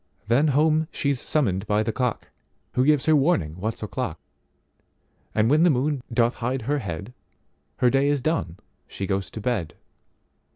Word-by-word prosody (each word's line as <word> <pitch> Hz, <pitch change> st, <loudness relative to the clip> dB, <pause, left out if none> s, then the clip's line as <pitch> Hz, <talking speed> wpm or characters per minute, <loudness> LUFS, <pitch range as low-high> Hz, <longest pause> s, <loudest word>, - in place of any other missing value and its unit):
Then 120 Hz, +8 st, +3 dB
home 155 Hz, +2 st, +3 dB
she's 140 Hz, -3 st, -1 dB
summoned 100 Hz, -10 st, 0 dB
by 105 Hz, +1 st, +2 dB
the 115 Hz, -, -1 dB
cock, 125 Hz, 0 st, -2 dB, 0.4 s
Who 125 Hz, -, +2 dB
gives 145 Hz, -1 st, +3 dB
her 155 Hz, -, +5 dB
warning 120 Hz, -, +1 dB
what's 110 Hz, +3 st, -3 dB
o'clock, 105 Hz, -6 st, -4 dB, 1.2 s
And 105 Hz, -, +3 dB
when 150 Hz, +5 st, +4 dB
the 175 Hz, -, +6 dB
moon 140 Hz, 0 st, 0 dB
doth 120 Hz, +1 st, +2 dB
hide 125 Hz, +1 st, -2 dB
her 145 Hz, +5 st, 0 dB
head, 95 Hz, -, -6 dB, 0.6 s
Her 125 Hz, -, +3 dB
day 135 Hz, +1 st, +3 dB
is 145 Hz, -1 st, +1 dB
done, 155 Hz, -, -1 dB, 0.3 s
she 95 Hz, -, -5 dB
goes 95 Hz, -1 st, -2 dB
to -, -, -7 dB
bed. 100 Hz, -9 st, -2 dB
125 Hz, 165 wpm, -24 LUFS, 105-145 Hz, 1.2 s, the